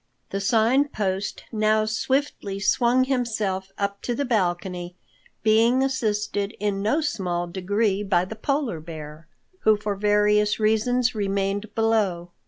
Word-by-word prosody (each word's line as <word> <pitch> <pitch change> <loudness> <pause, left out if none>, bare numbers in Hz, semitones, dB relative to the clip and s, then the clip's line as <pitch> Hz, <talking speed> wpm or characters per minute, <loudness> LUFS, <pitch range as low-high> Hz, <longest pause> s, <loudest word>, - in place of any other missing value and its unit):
The 195 - -2
Sign 230 +7 +3
Post 195 -6 -3
now 215 -1 +2
swiftly 220 -3 -1
swung 240 +5 +3
himself 215 -7 -1
up 200 0 -2
to 240 - -2
the 285 - -1
balcony, 180 -5 -1 0.5
being 230 +4 +4
assisted 210 -5 -1
in 205 -1 -1
no 225 +10 +1
small 185 - -2
degree 195 +3 0
by 185 -3 +1
the 220 - -7
Polar 270 - -1
Bear, 155 0 -9 0.3
who 215 -1 +4
for 210 0 -2
various 210 +1 +2
reasons 230 +3 +2
remained 200 0 -2
below. 205 -6 +1
210 Hz, 130 wpm, -24 LUFS, 195-225 Hz, 0.5 s, being